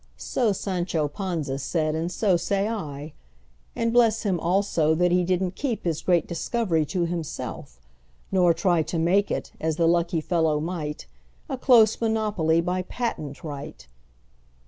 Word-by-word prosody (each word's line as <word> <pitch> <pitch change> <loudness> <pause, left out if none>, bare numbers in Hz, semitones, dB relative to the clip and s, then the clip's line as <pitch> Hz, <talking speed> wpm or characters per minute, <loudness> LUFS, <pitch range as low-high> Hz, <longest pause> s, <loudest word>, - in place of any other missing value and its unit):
So 235 -5 0
Sancho 180 -5 -1
Panza 155 -5 -3
said, 155 +2 -1
and 165 +2 -2
so 190 0 +2
say 200 +3 0
I:And 140 - -6
bless 230 -2 +4
him, 190 -5 0
also, 170 -3 +2
that 180 +1 +2
he 180 0 +3
did 185 +1 +1
n't 180 0 -3
keepHis 215 - -2
great 175 -3 +3
discovery 170 -2 0
to 180 0 0
himself; 165 - -5 0.5
nor 180 -3 +4
tryTo 165 -1 +1
make 190 +5 +2
it—as 160 -1 -3
the 165 0 +2
lucky 170 0 +2
fellow 160 -2 +1
might—A 150 - -6
close 230 -5 +5
monopoly 210 -8 +1
by 180 +2 -1
patent 180 - -4
right! 150 -1 -7
170 Hz, 135 wpm, -25 LUFS, 155-195 Hz, 0.5 s, close